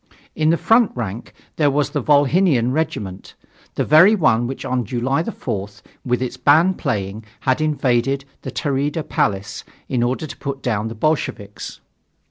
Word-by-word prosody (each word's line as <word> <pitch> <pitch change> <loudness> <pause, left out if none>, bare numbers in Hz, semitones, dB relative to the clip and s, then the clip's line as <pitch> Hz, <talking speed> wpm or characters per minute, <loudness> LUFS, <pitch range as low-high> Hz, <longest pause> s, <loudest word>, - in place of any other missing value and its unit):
In 155 0 +2
the 165 - +3
front 225 +3 +3
rank 115 -1 -5 0.3
there 150 -2 +3
was 145 +1 0
the 145 -2 -1
Volhynian 145 -2 +3
Regiment, 105 - -3 0.4
the - - 0
very 175 +8 +7
one 120 - +2
which 135 - -6
on 125 -1 0
July 130 +5 -1
4th, 105 - -5 0.2
with 125 0 0
its 125 - -5
band 165 +6 +4
playing, 105 - -2 0.2
had 130 +2 +1
invaded 135 -2 +1 0.2
the - - -6
Tauri'da 145 +2 -2
Palace, 100 0 -1 0.2
in 125 -3 -1
order 125 +6 -1
to 150 - -9
put 140 -1 -5
down 110 -3 -1
the 115 - -6
Bolsheviks. 110 -7 -3
135 Hz, 155 wpm, -20 LUFS, 115-155 Hz, 0.4 s, very